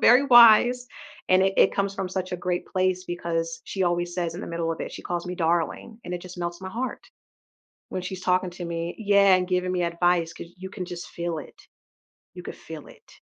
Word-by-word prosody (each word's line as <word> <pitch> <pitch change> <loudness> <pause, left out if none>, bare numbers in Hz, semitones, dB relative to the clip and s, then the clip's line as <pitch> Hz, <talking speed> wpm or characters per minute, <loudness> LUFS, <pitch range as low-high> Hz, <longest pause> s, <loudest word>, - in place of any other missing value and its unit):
Very 250 +4 +6
wise, 240 +1 +7 0.4
and 185 +1 +5
i 195 - +2
it - - +5
comes 200 0 0
from 190 -2 -3
such 185 0 -4
a - - -1
great 180 0 -2
place 185 0 0
because 165 -2 -3
she 190 -2 -2
always 175 0 0
says 170 -2 -2
in 175 - -6
the - - -6
middle 165 -1 -2
of 165 - -8
it, - - -4
she - - -8
calls 175 0 -3
me 180 - -4
"darling," 170 +6 -1
and 180 - -6
it 175 - -4
just 180 0 -10
melts 175 +1 -4
my 190 - -6
heart 250 +6 -4 0.9
when 185 - -3
she's 185 0 -6
talking 185 0 +1
to 175 0 -8
me 170 0 -4
Yeah, 200 -3 +5
and 180 0 -1
giving 180 0 0
me 180 -1 0
advice 170 0 +1
'cause 170 - -10
you 190 +1 -8
can 185 -3 -6
just 175 -1 -7
feel 170 -1 -4
it, - - -10 0.8
you - - -8
could - - -8
feel - - -10
it. - - -18
180 Hz, 225 wpm, -25 LUFS, 175-190 Hz, 0.9 s, wise